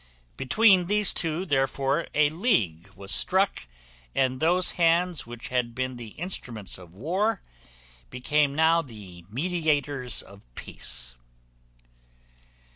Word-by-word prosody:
Between 190 - +4
these 210 0 +4
two, 165 +2 -2
therefore, 135 +1 0
a 150 0 +4
league 105 - 0
was 100 0 -7
struck, 190 - +1 0.5
and 130 -1 +1
those 175 +3 +2
hands 170 -3 +1
which 120 0 -8
had 125 -2 -1
been 130 0 -2
the 115 -3 -10
instruments 120 - -5
of 90 -1 -15
war 190 - -1 0.7
became 145 +2 +1
now 160 +2 +4
the 100 - -12
mediators 145 - 0
of 100 0 -15
peace. - - -3
145 Hz, 115 wpm, -26 LUFS, 120-175 Hz, 0.7 s, Between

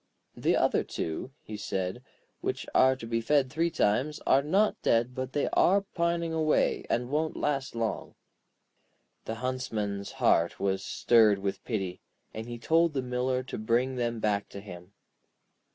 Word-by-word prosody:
'The - - +1
other - - +2
two,' 80 +9 -4
he 110 - -7
said, 95 +1 -3 0.4
'which - - -3
are 130 0 +5
to 130 - -9
be 115 0 -1
fed 135 +1 +2
three 165 +3 +1
times, 135 +2 +1
are 135 - +5
not 195 +9 +1
dead, 120 +2 +2
but 130 +1 -5
they 145 - +1
are 200 +2 +4
pining 170 -1 0
away, 155 -1 +2
and 125 +2 -1
won't 155 +2 -1
last 140 -3 -1
long.' 110 -5 -3 1.1
The 110 - -3
Huntsman's 105 -6 -3
heart 85 +1 +2
was 95 0 0
stirred 110 0 +4
with 100 0 -3
pity, 95 -6 -3 0.3
and 110 +1 -6
he 120 0 -6
told 165 +6 +2
the 135 -2 -1
Miller 125 +1 -1
to 130 - -6
bring 120 +4 +1
them 120 -2 -1
back 105 -2 0
to 100 - -8
him. 90 -2 -11
120 Hz, 160 wpm, -29 LUFS, 105-140 Hz, 1.1 s, are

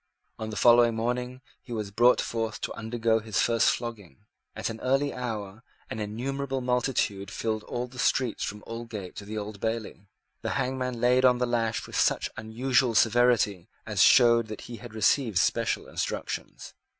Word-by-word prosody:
On 110 0 -4
the 110 - -6
following 120 +1 +5
morning 125 +2 -2 0.2
he 125 - -14
was 105 -3 -3
brought 120 +4 +4
forth 115 -2 -2
to - - -3
undergo 115 0 0
his 110 -2 -2
first 115 -1 +3
flogging. 105 - -5 0.3
At - - -3
an 110 - -8
early 135 +2 +1
hour 110 -4 -5 0.3
an 110 - -4
innumerable 135 +6 -3
multitude 125 -6 0
filled 110 0 -2
all 120 0 -3
the 125 0 -12
streets 125 -2 +1
from 105 +1 -5
Aldgate 115 -5 -7
to 100 - -7
the 110 +2 -6
Old 105 -1 -6
Bailey. 110 -3 -4 0.3
The - - -2
hangman 125 -2 -2
laid 125 +2 +3
on 125 -1 +5
the 125 - +1
lash 115 -2 -1
with - - -9
such - - +1
unusual 120 +2 +1
severity 115 -5 +3 0.2
as - - 0
showed 115 -2 +6
that 110 -1 -7
he 120 - -8
had 110 0 -11
received 110 0 +2
special - - +1
instructions. - - -5
115 Hz, 170 wpm, -27 LUFS, 110-125 Hz, 0.3 s, showed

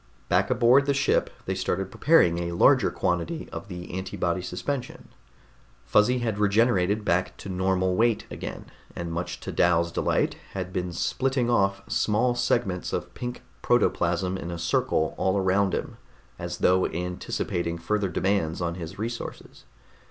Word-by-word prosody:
Back 90 +2 +2
aboard 125 +3 +4
the 140 - +2
ship 140 - +2 0.2
they 95 - -1
started 95 0 -2
preparing 90 - +4
a 85 0 -3
larger 130 +8 +5
quantity 90 - -2
of - - -7
the 90 -3 -8
antibody 95 -1 -2
suspension. 125 +9 -5 0.8
Fuzzy 125 +5 +3
had 115 -4 -2
regenerated 105 -1 +2
back 90 +2 0
to 100 - -8
normal 95 0 +1
weight 115 +1 +2
again, - - -6 0.3
and 85 -1 -4
much 85 +2 -4
to - - -5
Dal's 85 -1 +2
delight - - 0 0.2
had 95 -1 -4
been 90 -1 -2
splitting 125 +7 0
off 100 -4 +2
small 105 - +1
segments 120 -6 0
of - - -3
pink 125 0 -6 0.2
protoplasm 90 -5 +1
in 85 - -5
a 85 - -4
circle 80 -1 0
all 95 +1 +2
around 95 0 +2
him, - - -5 0.4
as 85 0 -4
though 90 +1 +3
anticipating 85 -1 -3
further 100 +3 -1
demands 90 -2 0
on 85 -1 -1
his 85 +1 -7
resources. 115 +3 -6
95 Hz, 150 wpm, -26 LUFS, 90-115 Hz, 0.8 s, larger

